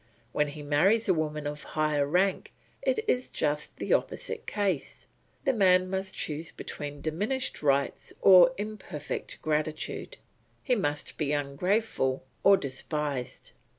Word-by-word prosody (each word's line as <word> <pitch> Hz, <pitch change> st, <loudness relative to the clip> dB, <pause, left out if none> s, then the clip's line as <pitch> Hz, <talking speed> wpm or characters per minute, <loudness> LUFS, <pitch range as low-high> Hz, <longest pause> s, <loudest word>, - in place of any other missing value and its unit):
When 150 Hz, +3 st, +1 dB
he 145 Hz, +1 st, -8 dB
marries 185 Hz, +11 st, +3 dB
a 190 Hz, -, +5 dB
woman 155 Hz, -2 st, -2 dB
of 150 Hz, 0 st, -4 dB
higher 150 Hz, -2 st, 0 dB
rank 185 Hz, +5 st, +1 dB, 0.3 s
it -, -, 0 dB
is 250 Hz, -8 st, +1 dB
just 150 Hz, 0 st, -2 dB
the -, -, 0 dB
opposite -, -, -2 dB
case; 195 Hz, -8 st, -2 dB, 0.4 s
the 270 Hz, -, +2 dB
man 185 Hz, -4 st, +4 dB
must 190 Hz, 0 st, -2 dB
choose 155 Hz, +2 st, -3 dB
between 145 Hz, -1 st, -6 dB
diminished 210 Hz, -, -2 dB
rights 140 Hz, -1 st, +1 dB
or 190 Hz, +5 st, +8 dB
imperfect 205 Hz, -8 st, -5 dB
gratitude; 155 Hz, 0 st, -2 dB, 0.5 s
he 255 Hz, -, +2 dB
must 150 Hz, -10 st, -1 dB
be 150 Hz, -2 st, 0 dB
ungrateful 145 Hz, -, 0 dB, 0.2 s
or 195 Hz, 0 st, +7 dB
despised. 140 Hz, -1 st, -4 dB
155 Hz, 130 wpm, -29 LUFS, 145-195 Hz, 0.5 s, or